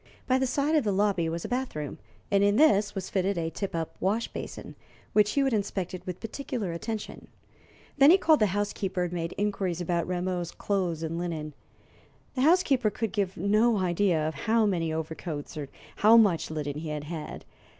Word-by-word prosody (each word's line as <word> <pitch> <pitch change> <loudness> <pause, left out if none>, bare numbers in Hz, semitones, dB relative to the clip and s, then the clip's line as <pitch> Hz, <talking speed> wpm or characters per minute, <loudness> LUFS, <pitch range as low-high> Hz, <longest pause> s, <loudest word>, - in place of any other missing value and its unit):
By 255 0 +2
the 265 - +1
side 280 +4 0
of 305 -3 +4
the 210 - +1
lobby 195 -4 +1
was 165 +1 -4
a - - -2
bath 255 -3 -2
room, 150 -2 -5 0.3
and 200 0 +4
in 205 0 +3
this 215 -8 +4
was 195 - -5
fitted 195 0 0
a 165 -1 -2
tip 195 -1 -4
up 165 -1 -3
wash 210 +5 0
basin, - - -7 0.4
which 210 0 +4
Hewitt 275 -3 +2
inspected 190 -4 -3
with 180 -1 -5
particular 225 -4 -4
attention. 215 +5 -5 0.7
Then 275 +1 +8
he 365 - +8
called 315 -5 +4
the 215 - +4
housekeeper, 195 -2 -2
and 175 0 -3
made 170 -1 -3
inquiries 195 -4 -1
about 170 -1 -1
Rameau's 180 -1 -2
clothes 180 -5 -1
and 165 +1 -3
linen. 160 -3 -4 0.8
The 255 - -2
housekeeper 280 -7 +4
could 220 0 -3
give 195 -3 -1
no 215 +5 +3
idea 175 -3 +1
of 160 - -3
how 225 +3 +2
many 170 -5 0
overcoats 160 -1 -5
or 145 -3 -5 0.3
how 220 +2 +7
much 200 -8 +3
linen 150 -2 -4
he 160 0 -5
had 150 -1 -4
had. 155 0 -7
195 Hz, 190 wpm, -28 LUFS, 165-215 Hz, 0.8 s, Then